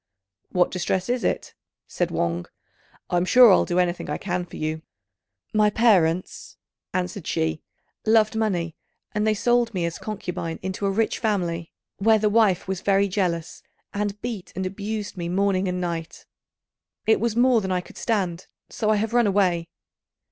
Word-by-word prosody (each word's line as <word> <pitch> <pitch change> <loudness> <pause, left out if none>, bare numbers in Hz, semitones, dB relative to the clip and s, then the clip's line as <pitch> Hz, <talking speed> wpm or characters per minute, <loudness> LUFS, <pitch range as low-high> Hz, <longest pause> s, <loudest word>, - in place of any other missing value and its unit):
"What 180 -1 +2
distress 185 +2 -1
is 245 -1 0
it?" - - -1 0.3
said - - -2
Wang; 85 +1 -1 0.6
"I'm 175 0 +2
sure 245 +4 +7
I'll - - +5
do 175 - -1
anything 180 -3 0
I 150 - -1
can 180 -1 -3
for - - -11
you." 155 0 -3 0.7
"My 215 -1 +4
parents," 185 -6 +1 0.3
answered 185 -1 -3
she, 160 -1 -1 0.4
"loved 220 -1 +3
money, 180 -7 -1 0.4
and 210 0 0
they 215 - +3
sold 240 0 +1
me 175 -2 0
as 170 - -4
concubine 180 -6 -4
into 190 +2 -2
a - - +2
rich 215 +3 0
family, 175 -7 -1 0.3
where 220 +2 +4
the 210 0 +2
wife 205 -5 +3
was 190 -2 -3
very 200 0 +3
jealous, 175 -4 -2 0.3
and 205 0 -2
beat 225 -6 -5
and 190 - -2
abused 205 +2 -4
me 170 -1 -3
morning 195 +1 +1
and 180 0 -2
night. 170 -2 -4 0.8
It 220 - +4
was 230 -1 0
more 245 -1 +4
than 190 -1 -3
I 180 -1 +1
could - - -13
stand, 185 -6 -1 0.2
so 215 - -1
I 215 - +4
have 220 +2 -1
run 240 -2 +4
away." 180 -4 +1
190 Hz, 170 wpm, -24 LUFS, 175-215 Hz, 0.8 s, sure